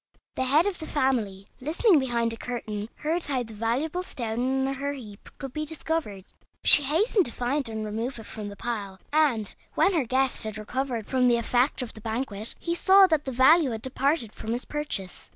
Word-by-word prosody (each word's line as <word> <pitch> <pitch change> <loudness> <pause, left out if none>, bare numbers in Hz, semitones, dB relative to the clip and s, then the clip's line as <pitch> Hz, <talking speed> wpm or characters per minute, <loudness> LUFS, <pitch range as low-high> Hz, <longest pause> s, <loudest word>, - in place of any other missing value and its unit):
The 260 - -1
head 295 +6 +4
of 405 -3 -2
the 315 - -6
family, 230 -9 0
listening 320 - +3
behind 235 -3 0
a - - -5
curtain, 225 -3 -5
heard 330 +3 -2
how 265 -3 -1
the 225 -1 -11
valuable 250 +11 -1
stone 255 -2 -2
in 270 - -1
her 280 +1 -3
heap 215 -7 -10
could 270 -3 -7
be 305 - -2
discovered. 305 - -3 0.4
She - - +8
hastened 345 - +2
to - - -3
find 255 +2 -1
and 220 -1 -4
remove 225 +5 -3
it 225 - -9
from 215 -2 -7
the 200 - -8
pile; 200 -4 -4
and, 265 -10 +2 0.2
when 395 - +3
her 310 -7 +1
guest 260 +2 +1
had 215 -1 -4
recovered 240 +1 -3
from 255 -1 +2
the 240 -1 +4
effect 245 +3 +1
of 240 - -8
the 220 - -11
banquet, 220 -1 -3
he 340 - -2
saw 385 +3 +6
that 315 -5 +1
the 265 - -3
value 270 +5 +5
had 225 -2 -5
departed 265 -3 0
from 225 - -4
his 245 - -3
purchase. 295 -11 -5
255 Hz, 205 wpm, -26 LUFS, 225-295 Hz, 0.4 s, She